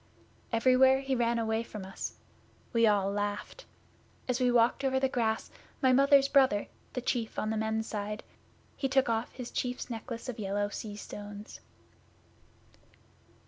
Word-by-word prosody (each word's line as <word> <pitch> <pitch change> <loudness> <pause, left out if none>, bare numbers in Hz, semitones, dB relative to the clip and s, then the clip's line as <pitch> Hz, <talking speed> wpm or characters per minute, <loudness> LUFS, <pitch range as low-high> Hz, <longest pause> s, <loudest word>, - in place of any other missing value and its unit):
Everywhere 260 +3 +5
he 270 0 -2
ran 235 -1 +1
away 220 0 0
from 210 -4 -7
us. 190 - -5 0.6
We 230 -1 +5
all 200 -2 +2
laughed. 205 - -4 0.6
As 250 0 0
we 250 -1 +3
walked 240 +2 +3
over 265 -1 +2
the 265 - +2
grass 225 -4 -1 0.3
my 260 -2 +4
Mother's 275 +1 +6
brother 265 -7 +3 0.2
the 250 - -2
Chief 235 -3 -2
on 215 - -1
the - - -1
Men's 220 0 -1
Side 210 0 -4 0.5
he 270 - -1
took 265 -1 +3
off 225 +1 -1
his 250 -2 -7
Chief's 250 0 -3
necklace 230 +1 -6
of 245 -3 -5
yellow 205 0 -1
sea 210 0 -6
stones. 205 0 -9
230 Hz, 150 wpm, -30 LUFS, 210-260 Hz, 0.6 s, Mother's